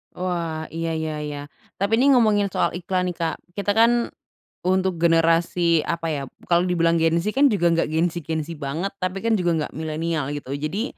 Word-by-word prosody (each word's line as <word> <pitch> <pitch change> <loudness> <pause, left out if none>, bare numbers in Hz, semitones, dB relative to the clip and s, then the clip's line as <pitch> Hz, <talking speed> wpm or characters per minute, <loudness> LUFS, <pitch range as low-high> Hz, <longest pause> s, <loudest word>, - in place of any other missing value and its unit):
Wah, 170 -3 -3
iya 165 0 -2
iya 155 -1 -3
iya. 145 -1 -5 0.4
Tapi, 200 +3 +1
ini 260 +5 +4
ngomongin 210 -4 +3
soal - - 0
iklan, 180 +1 -1
nih, 180 - -2
Kak. 165 -2 -2 0.2
Kita 200 +1 -1
kan, 235 +1 +4 0.5
untuk 185 -2 0
generasi, 165 0 +3
apa 165 +2 -3
ya, 145 - -2
b - - -48
kalau 170 0 +3
dibilang 170 -1 +2
Gen 165 +1 +3
Z, 210 +5 -1
kan 280 +2 +5
juga 175 -6 +2
nggak 165 -2 +1
Gen 160 +2 +1
Z 170 - -4
Gen 160 0 -3
Z 170 - -7
banget, 160 +8 -3
tapi 185 +1 -2
kan 230 - +3
juga 170 -6 +1
nggak - - -12
milenial, 160 -2 -2
gitu 145 -2 -5
ya. 145 +2 -3
Jadi, 205 +6 -2
170 Hz, 210 wpm, -23 LUFS, 160-190 Hz, 0.5 s, kan